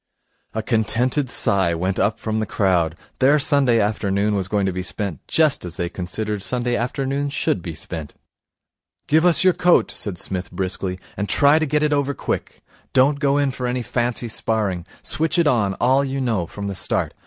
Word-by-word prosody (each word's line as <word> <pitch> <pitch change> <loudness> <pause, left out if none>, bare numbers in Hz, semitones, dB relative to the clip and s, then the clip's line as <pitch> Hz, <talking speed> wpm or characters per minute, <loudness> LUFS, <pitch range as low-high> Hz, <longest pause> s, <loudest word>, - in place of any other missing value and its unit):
A 110 - -2
contented 120 +5 +1
sigh 95 -7 +2
went 90 +3 -2
up 105 +2 +1
from 110 -1 -2
the 110 - -2
crowd. 90 -5 +1 0.2
Their 140 +3 +5
Sunday 140 -5 +3
afternoon 105 -1 0
was 95 -2 -1
going 100 0 0
to 95 - 0
be 90 0 -4
spent 90 -3 -3
just 155 -3 +2
as 85 -2 -7
they 85 -2 -2
considered 100 +4 -3
Sunday 120 +3 -1
afternoons 140 +3 -2
should 95 - 0
be 85 -2 -6
spent. 80 -1 -6 0.9
'Give 160 +3 +3
us 175 - +4
your 185 -1 +5
coat,' 175 0 +3
said 100 -4 -4
Psmith 95 -1 -2
briskly, 95 0 -3 0.2
'and 100 +1 -3
try 145 +2 +5
and 155 -2 0
get 150 +1 +1
it 150 -1 +2
over 140 -1 0
quick. - - -4 0.3
Don't 140 +2 +3
go 140 -1 +2
in 140 -2 +1
for 125 -1 -4
any 125 0 -2
fancy 120 0 -1
sparring. 105 -6 -1 0.2
Switch 160 +3 0
it 170 - +3
on, 110 -9 +2
all 130 +3 +2
you 135 0 -3
know, 110 -10 -1
from 100 +2 -7
the 100 - -3
start. 95 - 0
110 Hz, 190 wpm, -21 LUFS, 95-140 Hz, 0.9 s, Their